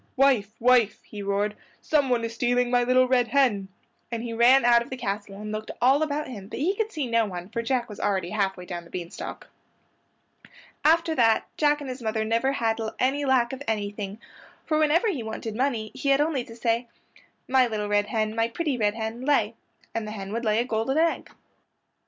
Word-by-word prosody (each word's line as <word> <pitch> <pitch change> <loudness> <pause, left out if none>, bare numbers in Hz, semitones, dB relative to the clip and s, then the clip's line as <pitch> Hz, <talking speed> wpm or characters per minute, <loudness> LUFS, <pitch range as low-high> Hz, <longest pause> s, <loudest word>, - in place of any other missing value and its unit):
"Wife, 250 -6 +3
wife," 240 -3 +3
he 210 - -9
roared, 200 +1 -1 0.2
"someone 265 -6 +1
is 230 0 -3
stealing 245 +1 +1
my 245 0 +4
little 255 +1 +4
red 250 -1 +3
hen," 235 -9 +2 0.4
and 230 -1 -3
he 235 -1 -4
ran 240 +3 +5
out 240 -1 +6
of 235 - -7
the 260 - -5
castle 200 -3 -4
and 210 0 -6
looked 215 0 -5
all 265 +4 +4
about 300 -1 -1
him; 205 -6 -8
but - - -7
he 335 +8 +1
could 440 +1 -1
see 305 -7 -2
no 230 -2 +2
one, 180 -1 -7
for 230 +2 -2
Jack 240 0 -1
was 210 -3 -10
already 190 -3 -1
half 195 -2 0
way 180 - -9
down 175 -1 -6
the 170 - -17
bean 175 -2 -6
stalk. - - -8 1.3
After 330 +1 +4
that 225 -6 +3
Jack 295 -1 +2
and 285 - -6
his 255 0 -8
mother 220 -1 -1
never 230 +5 +1
had 225 -3 0 0.2
any 280 +3 +1
lack 260 -2 +2
of 265 - -7
anything, 205 -1 -3 0.5
for 310 -1 +1
whenever 310 +7 +3
he 310 - -1
wanted 220 0 -5
money 235 -4 -1
he 280 - -2
had 275 0 +4
only 295 -4 +1
to 230 - -11
say, 235 +1 0 0.6
"My 260 -1 +4
little 215 -2 -3
red 205 0 +1
hen, 215 -2 -1
my 225 0 +2
pretty 275 +1 -2
red 210 -1 +1
hen, 225 +1 -4
lay," 250 -6 +2 0.4
and 225 -2 -3
the 215 - -5
hen 195 -1 -6
would 230 +1 -2
lay 215 0 +2
a 235 - +1
gold 225 0 -2
egg. 330 +1 +1
235 Hz, 210 wpm, -26 LUFS, 215-265 Hz, 1.3 s, out